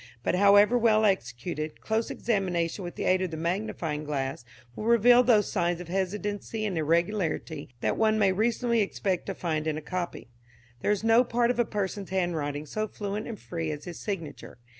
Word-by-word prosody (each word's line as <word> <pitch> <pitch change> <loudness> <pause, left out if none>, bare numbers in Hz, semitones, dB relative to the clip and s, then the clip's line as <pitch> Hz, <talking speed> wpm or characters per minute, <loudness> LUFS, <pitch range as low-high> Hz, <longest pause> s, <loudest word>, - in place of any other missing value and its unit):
But - - +1
however 205 +5 +6
well 220 -2 +4
executed, 155 - -2
close 225 +1 -1
examination 185 -4 -1
with 175 - -6
the - - -4
aid 185 0 +3
of 185 - -1
the 160 - -6
magnifying 170 -3 -2
glass 135 -4 -3 0.3
will 215 - -5
reveal 235 +1 +6
those 230 -4 +3
signs 175 -3 0
of 180 -1 -8
hesitancy 205 +3 -2
and 200 -4 -2
irregularity 165 -1 -1
that - - 0
one 220 -1 +3
may 200 -3 +4
reasonably 230 +3 +1
expect 195 -2 -1
to - - -3
find 155 -3 -2
in 155 -1 -1
a - - -2
copy. 175 -4 -5 0.5
There - - 0
is 210 0 +1
no 225 +2 +5
part 240 0 +1
of 245 - -4
a 240 - +4
person's 200 -2 -3
handwriting 160 -6 -1
so 215 +7 -3
fluent 205 0 -4
and 230 -3 -6
free 165 -2 -4
as 150 -1 -5
his 175 -2 -7
signature. 165 - -6
190 Hz, 185 wpm, -28 LUFS, 165-215 Hz, 0.5 s, however